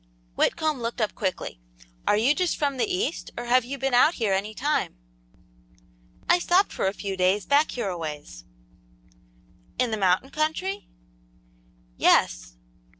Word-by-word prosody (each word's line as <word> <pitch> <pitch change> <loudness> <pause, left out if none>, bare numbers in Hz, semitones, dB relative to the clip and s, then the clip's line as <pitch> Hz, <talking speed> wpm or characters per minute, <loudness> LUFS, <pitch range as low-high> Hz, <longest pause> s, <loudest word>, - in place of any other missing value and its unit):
Whitcomb 310 - 0
looked 230 +1 -4
up 215 -2 0
quickly. 185 - -4 0.5
"Are 205 - +4
you 245 +7 +3
just 360 +2 -1
from 280 -3 -1
the 255 - +1
East, 375 +5 -2
or 240 - -4
have 250 +1 +3
you 270 +4 -6
been 270 0 -2
out 275 +7 +5
here 215 -5 0
any 205 +3 -2
time?" 290 - -1 1.3
"I 355 - +4
stopped 360 +3 +2
for - - -1
a - - +1
few 195 -1 -5
days, 190 +2 +1
back 290 +2 +3
here 240 -5 -3
a 185 - -3
ways." 150 - -7 1.3
"In 245 -2 +1
the 220 - -1
mountain 190 +7 +1
country?" 305 -11 -2 1.1
"Yes." - - +2
235 Hz, 150 wpm, -25 LUFS, 190-290 Hz, 1.3 s, out